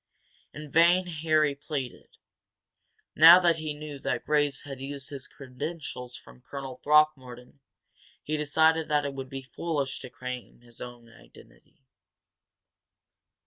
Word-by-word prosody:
In 150 -1 -10
vain 175 +4 +5
Harry 155 -3 +1
pleaded. 140 -3 -6 1.0
Now 165 +3 +10
that 170 -2 +3
he 155 -2 -4
knew 150 -1 -8
that - - -2
Graves 145 -2 +1
had 135 -2 -8
used 140 0 -6
his 135 -2 -7
credentials 130 -2 -7
from 125 - -17
Colonel 135 -1 -7
Throckmorton, 140 -4 +1 0.6
he 155 - -2
decided 160 +2 +2
that 150 -1 +1
it 140 - -3
would 135 -1 -7
be 135 -1 -6
foolish 140 0 -3
to 130 - -9
claim 125 -1 -8
his 120 -1 -12
own 120 -1 -9
identity. 115 +3 -20
145 Hz, 130 wpm, -28 LUFS, 130-155 Hz, 1.0 s, Now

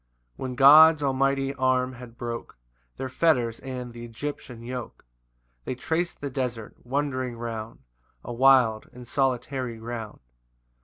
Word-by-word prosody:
3 - - -16
[When 130 -1 -3
God's 150 +3 +8
almighty 135 0 +1
arm 130 -1 +1
had 120 -1 -12
broke 120 - -6 0.4
Their 130 - -3
fetters 125 -5 +1
and 125 -2 -6
th' - - -12
Egyptian 120 0 -7
yoke, 125 - -7 0.6
They 130 - -4
trac'd 165 +7 -2
the 140 -1 -4
desert, 125 -4 -3
wandering 130 -2 -2
round 115 - -6 0.4
A 120 - -6
wild 125 -3 +4
and 125 -1 -11
solitary 130 -2 -1
ground. 115 -1 -7
125 Hz, 135 wpm, -26 LUFS, 120-135 Hz, 0.6 s, God's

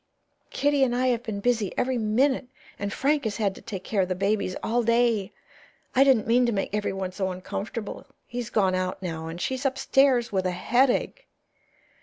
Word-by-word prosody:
Kitty 285 -1 +2
and 245 -2 +1
I 255 +1 +2
have 235 -2 +1
been 215 -4 -5
busy 225 -4 0
every 255 -1 0
minute, 250 +5 +1 0.3
and 200 0 -3
Frank 285 +6 +1
has 215 -2 -2
had 205 -4 0
to - - -13
take 190 -4 -6
care 205 -3 0
of 185 - 0
the 185 - -1
babies 195 0 0
all 230 +2 +1
day. 230 -3 +2 0.6
I 265 - +7
didn't 265 -6 +4
mean 240 +2 +3
to - - +1
make 195 -2 -2
everyone 195 -3 -2
so 190 0 -2
uncomfortable. 200 +4 -6 0.2
He's 240 -1 -5
gone 195 -5 +2
out 185 +1 -2
now, 160 -2 -4
and 165 +1 -6
she's 260 +7 -2
upstairs 270 -2 +2
with 190 -2 0
a 180 -1 -3
headache." 265 - +2
225 Hz, 190 wpm, -26 LUFS, 195-250 Hz, 0.6 s, I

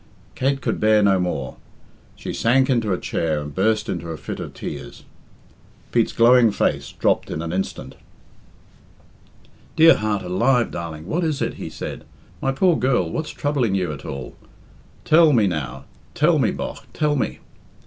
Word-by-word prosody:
Kate 135 +1 0
could - - -2
bear 110 -1 +4
no 95 -2 +4
more. 90 -7 -3 0.6
She - - -6
sank 130 +3 +2
into 115 -5 +1
a 90 - +1
chair 80 -3 -1
and 75 0 -7
burst 110 +5 +1
into 85 -2 -4
a 80 - -5
fit 70 - -6
of - - -7
tears. - - -7 0.9
Pete's 115 -2 +2
glowing 120 0 +5
face 100 - -1
dropped - - 0
in - - -4
an 85 0 -4
instant. 95 +1 -4 1.8
"Dear 165 +1 +8
heart 105 -2 -1
alive, 115 +7 +1
darling, 80 -2 -6
what 165 - -1
is 155 -4 -1
it?" - - -1
he - - -5
said. - - -7 0.4
"My 135 - +1
poor 175 +5 +3
girl, 125 - +1
what's 155 - -3
troubling 135 -9 0
you 90 -4 -1
at 70 - -9
all? 70 -3 -7 0.7
Tell 160 -1 +6
me, 110 -4 +4
now 70 -8 -3 0.3
tell - - +3
me, - - +3
bogh, - - -5
tell 150 -1 +1
me." 130 - -2
110 Hz, 165 wpm, -22 LUFS, 85-135 Hz, 1.8 s, Dear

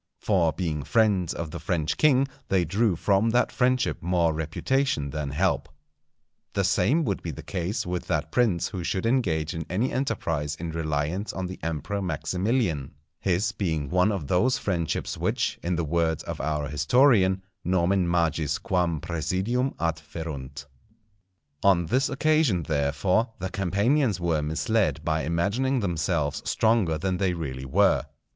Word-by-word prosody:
For 90 -6 +2
being 80 -5 -2
friends 95 - +2
of 85 -2 -5
the - - -6
French 80 -1 -1
king 140 -3 +4 0.2
they 95 -3 +2
drew 100 +3 +1
from 100 +6 +2
that 120 +2 +2
friendship 130 0 +1
more 85 -1 +2
reputation 80 - -1
than 75 -1 -3
help. 85 +6 0 0.8
The 100 - +1
same 105 - +2
would 100 -5 -1
be 85 - -5
the 75 - -7
case 95 +3 -3
with 90 0 -3
that 80 -2 -1
prince 110 -9 +2
who 90 -3 -5
should 95 +4 -2
engage 90 - +1
in 80 -1 -4
any 110 +9 0
enterprise 80 - -1
in 85 -1 -5
reliance 80 +4 -2
on 95 - -3
the 95 +1 -7
Emperor 85 +5 -3
Maximilian, 90 - -1 0.2
his 95 +4 +1
being 80 -9 -2
one 90 +3 +3
of 95 -7 -3
those 115 - +2
friendships 85 -5 -2
which, - - -1
in 90 +1 -1
the 85 -1 -1
words 80 0 0
of - - -5
our 75 0 -1
historian, 95 - +3 0.2
nomen 90 0 +2
magis 80 -3 +1
quam 85 -4 0
praesidium 95 - -1
adferunt. 75 -3 -5 1.0
On 95 -3 +4
this 130 - +1
occasion, 140 - +2
therefore, 75 - +1
the 95 0 -4
Campanians 100 - +1
were 85 -3 +1
misled 80 +2 0
by 80 -1 +1
imagining 100 - 0
themselves 85 -6 -1
stronger 110 -8 +2
than 90 +3 -1
they 95 -1 +1
really 65 -5 -5
were. 75 -2 +3
90 Hz, 150 wpm, -26 LUFS, 80-105 Hz, 1.0 s, king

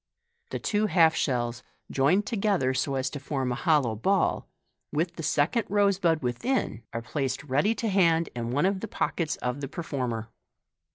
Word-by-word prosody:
The - - -3
two 215 0 0
half 165 -5 +5
shells, 120 -3 -1 0.3
joined 175 +10 +3
together 195 - +1
so 135 +2 -1
as 130 0 0
to 145 - -5
form 135 -2 -2
a - - +1
hollow 135 -4 +2
ball, 190 - +1 0.4
with 170 +3 -1
the - - -6
second 160 +9 +1
rose 200 -1 +3
bud 165 -5 +2
within, 125 - -1
are 115 0 -4
placed 135 0 -2
ready 150 - +1
to 230 - -2
hand 170 -5 +3
in 115 -1 -3
one 145 +7 +1
of 195 0 +1
the 225 - -5
pochettes 165 -5 -1
of 125 +3 -2
the 135 - -3
performer. 125 -8 -4
150 Hz, 175 wpm, -27 LUFS, 130-190 Hz, 0.4 s, half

